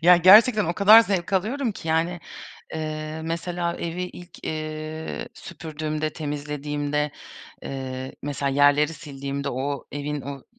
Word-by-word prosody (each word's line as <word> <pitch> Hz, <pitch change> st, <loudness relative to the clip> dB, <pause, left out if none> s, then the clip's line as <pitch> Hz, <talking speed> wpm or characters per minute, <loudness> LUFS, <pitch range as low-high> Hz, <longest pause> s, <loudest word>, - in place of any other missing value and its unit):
Ya, 180 Hz, +1 st, +8 dB
gerçekten 210 Hz, +4 st, +7 dB
o 170 Hz, -, 0 dB
kadar 210 Hz, +5 st, +8 dB
zevk 195 Hz, -3 st, -1 dB
alıyorum 225 Hz, +5 st, 0 dB
ki, 165 Hz, -, -8 dB
yani, 165 Hz, +2 st, +1 dB, 0.6 s
ııı, 155 Hz, 0 st, -4 dB
mesela 170 Hz, +1 st, -2 dB
evi 170 Hz, +2 st, -3 dB
ilk, 180 Hz, 0 st, -10 dB
iii, 155 Hz, 0 st, -4 dB
süpürdüğümde, 155 Hz, -1 st, -4 dB
temizlediğimde, 150 Hz, 0 st, -2 dB, 0.5 s
iii, 130 Hz, -1 st, -5 dB
mesela 140 Hz, -1 st, -2 dB
yerleri 145 Hz, +3 st, +4 dB
sildiğimde 140 Hz, -2 st, -5 dB
o 140 Hz, +3 st, -3 dB
evin 145 Hz, 0 st, -3 dB
o 140 Hz, -1 st, -7 dB
155 Hz, 125 wpm, -24 LUFS, 145-175 Hz, 0.6 s, Ya